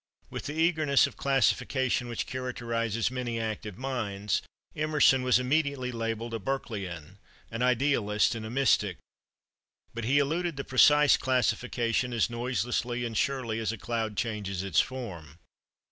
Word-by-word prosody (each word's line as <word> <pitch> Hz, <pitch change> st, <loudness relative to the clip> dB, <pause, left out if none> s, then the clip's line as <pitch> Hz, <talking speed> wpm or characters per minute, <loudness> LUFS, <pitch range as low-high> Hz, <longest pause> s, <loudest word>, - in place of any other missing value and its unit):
With -, -, -5 dB
the 150 Hz, -, -5 dB
eagerness 155 Hz, -4 st, +4 dB
of -, -, -6 dB
classification 130 Hz, -1 st, +1 dB
which 120 Hz, -1 st, -3 dB
characterizes 115 Hz, -3 st, -2 dB
many 125 Hz, -3 st, -3 dB
active 110 Hz, -3 st, -4 dB
minds, 110 Hz, -6 st, -2 dB, 0.3 s
Emerson 150 Hz, -3 st, +3 dB
was 125 Hz, -1 st, +4 dB
immediately 135 Hz, -1 st, 0 dB
labelled 115 Hz, 0 st, -3 dB
a 115 Hz, -, -2 dB
Berkeleyan, 100 Hz, -, -5 dB, 0.3 s
an 115 Hz, +1 st, -4 dB
idealist, 125 Hz, -4 st, +2 dB
and 115 Hz, -1 st, -5 dB
a 110 Hz, -, -6 dB
mystic. 135 Hz, 0 st, +2 dB, 1.0 s
But 120 Hz, -1 st, -4 dB
he 135 Hz, +5 st, +3 dB
eluded 160 Hz, +3 st, 0 dB
the 140 Hz, -, -3 dB
precise 145 Hz, +3 st, +5 dB
classification 125 Hz, -1 st, 0 dB
as 120 Hz, 0 st, +1 dB
noiselessly 120 Hz, +1 st, -1 dB
and 115 Hz, -1 st, -5 dB
surely 125 Hz, -3 st, -1 dB
as 110 Hz, -1 st, -1 dB
a 115 Hz, -, -6 dB
cloud 110 Hz, -1 st, -3 dB
changes 100 Hz, -5 st, -2 dB
its 95 Hz, -5 st, +2 dB
form. 85 Hz, -, -7 dB
120 Hz, 140 wpm, -28 LUFS, 110-130 Hz, 1.0 s, precise